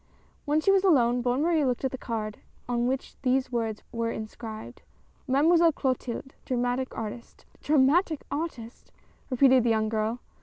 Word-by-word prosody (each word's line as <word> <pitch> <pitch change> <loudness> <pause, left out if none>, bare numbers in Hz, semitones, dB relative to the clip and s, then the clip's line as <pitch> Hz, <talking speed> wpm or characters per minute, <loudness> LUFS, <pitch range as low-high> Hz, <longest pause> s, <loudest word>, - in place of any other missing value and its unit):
When 295 +1 +2
she 390 - +3
was 390 -1 +3
alone, 245 -9 +4
Bonne 250 +4 +1
Marie 325 -2 +2
looked 255 0 0
at 265 - 0
the 260 - -5
card 215 -3 -4 0.3
on 240 0 0
^hich 265 +1 -3
these 255 0 +1
words 225 -3 -2
were 230 -1 -2
inscribed, 220 0 -7 0.5
MADEMOISELLE 325 +5 +4
CLOTILDE. 260 -1 -3
DRAMATIC 245 +1 -2
ARTIST. 225 +2 -7 0.2
"Dramatic 300 +3 +3
artist?" 275 -7 -5 0.4
repeated 260 -1 +5
the 235 - +2
young 220 -1 +1
girl. 220 +2 -1
255 Hz, 150 wpm, -27 LUFS, 230-285 Hz, 0.5 s, repeated